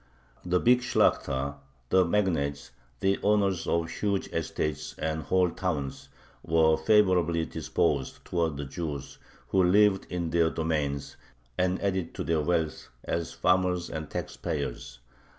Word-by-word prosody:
The 90 0 +1
big 125 +3 +4
Shlakhta, 70 - +1 0.3
the 95 0 +5
magnates, 80 -7 0 0.3
the 95 0 +2
owners 100 -4 +2
of 85 0 +1
huge 100 +3 -2
estates 75 -2 -3
and 80 0 -2
whole 90 +3 +2
towns, 75 -8 -3 0.3
were 80 -1 +4
favorably 85 -2 +3
disposed 65 - -1
towards 85 -4 -1
the 70 - -4
Jews 70 -2 -6 0.3
who 95 -1 +3
lived 100 +2 +4
in 85 -2 -3
their 85 -1 +3
domains, 75 -3 -2 0.4
and 90 +4 +1
added 95 -4 -1
to - - -3
their 80 -2 +1
wealth 80 -1 -1
as 85 0 -2
farmers 90 -1 +1
and 80 -1 -5
tax - - -5
payers. 60 - -4
85 Hz, 135 wpm, -28 LUFS, 75-95 Hz, 0.4 s, the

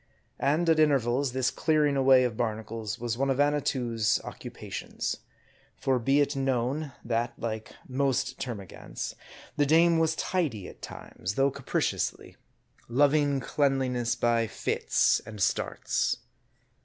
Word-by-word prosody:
And, 155 +5 +2
at 160 -1 +4
intervals, 135 -3 +2
this 130 0 +1
clearing 150 -3 +2
away 130 -1 +6
of 120 -3 -1
barnacles 110 0 -3
was 120 0 -3
one 135 0 +1
of 135 0 0
Annatoo's 130 -6 +1
occupations. - - -5 0.6
For 130 -2 +1
be 135 +5 +3
it 145 0 0
known, 135 +2 -1
that, 120 +1 -1
like 110 -1 -5
most 135 -1 0
termagants, 105 -8 -6 0.4
the 145 - +3
dame 165 +2 +5
was 160 0 +2
tidy 145 - -1
at - - -13
times, 95 +2 -6
though 135 +1 +3
capriciously; - - -2 0.5
loving 145 +2 +3
cleanliness 130 -4 +1
by 115 -1 +2
fits - - +1
and 110 0 -9
starts. - - 0
130 Hz, 125 wpm, -28 LUFS, 115-145 Hz, 0.6 s, away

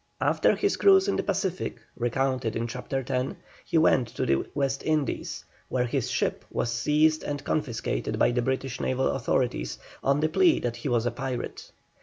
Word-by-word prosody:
After - - +3
his - - 0
cruise 385 0 +6
in 400 - +1
the - - +1
Pacific, 190 -7 -2 0.2
recounted 125 -1 0
in 115 - -1
Chapter 125 +2 -4
X., 130 +1 -1 0.3
he - - 0
went 145 -6 +4
to - - -3
the 70 0 +1
West 135 -1 0
Indies, 155 -3 -1 0.2
where 125 -1 +1
his 125 0 -1
ship - - -1
was 120 - -1
seized 150 +6 +2
and 145 -1 -4
confiscated 120 - -2
by - - +4
the 120 0 +1
British 130 +1 -2
naval 130 0 +1
authorities, 120 - -1 0.3
on 140 +1 +3
the 155 - +2
plea 345 - +4
that 120 -1 -2
he 125 +4 -3
was 120 -1 +1
a 120 - +1
pirate. 130 0 -5
130 Hz, 180 wpm, -27 LUFS, 120-150 Hz, 0.3 s, cruise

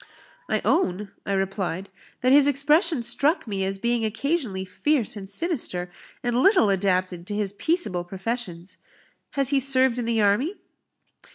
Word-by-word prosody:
"I - - 0
own," 200 - 0 0.2
I 200 - 0
replied, 190 -1 -2 0.3
"that 255 - +3
his 285 0 +7
expression 295 +1 +3
struck 280 +8 +1
me 200 -4 -3
as 195 +1 -2
being 235 +2 0
occasionally 220 - -2
fierce 225 +5 0
and 195 -2 -7
sinister, 200 - -2 0.3
and 245 0 +1
little 370 - +4
adapted 185 -2 0
to 205 - -4
his 205 -2 -2
peaceable 260 - -1
professions. 190 -1 -5 0.6
Has 275 -2 +2
he 280 -1 +3
served 260 -2 +4
in 240 - -2
the 230 -1 0
army?" 215 - +2
225 Hz, 150 wpm, -24 LUFS, 195-275 Hz, 0.6 s, his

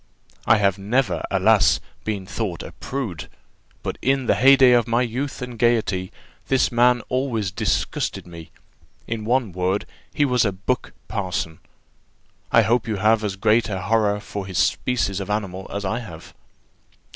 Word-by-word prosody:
I 110 - +6
have 100 -1 +1
never, 100 -3 0
alas! 95 -2 +4 0.3
been 100 -3 -3
thought 100 -3 -4
a - - -8
prude, 120 - -5 0.5
but - - -4
in 135 0 +1
the - - +3
heyday 135 -1 +6
of 120 -2 +4
my 120 +2 +2
youth 130 +3 -4
and 125 -2 -8
gaiety, 105 -6 +1 0.4
this 135 0 +2
man 120 0 +4
always 120 -7 -1
disgusted - - -2
me. 85 -2 -11 0.6
In 110 -2 -4
one 120 -3 +1
word, 90 +3 -1 0.3
he 145 - +2
was 125 -3 +2
a 100 - +1
buck 100 +7 -3
parson. 95 -6 -3 0.9
I - - +6
hope 120 0 +1
you 110 - -1
have 110 +2 +2
as 100 -2 -2
great 110 +4 +2
a 95 -2 -2
horror 105 0 +1
for 100 -1 -6
this 95 -2 -5
species 100 +1 +1
of 100 - -6
animal 95 -3 -3
as 100 0 -4
I 95 - -1
have?" 90 -10 -10
110 Hz, 160 wpm, -22 LUFS, 95-120 Hz, 0.9 s, I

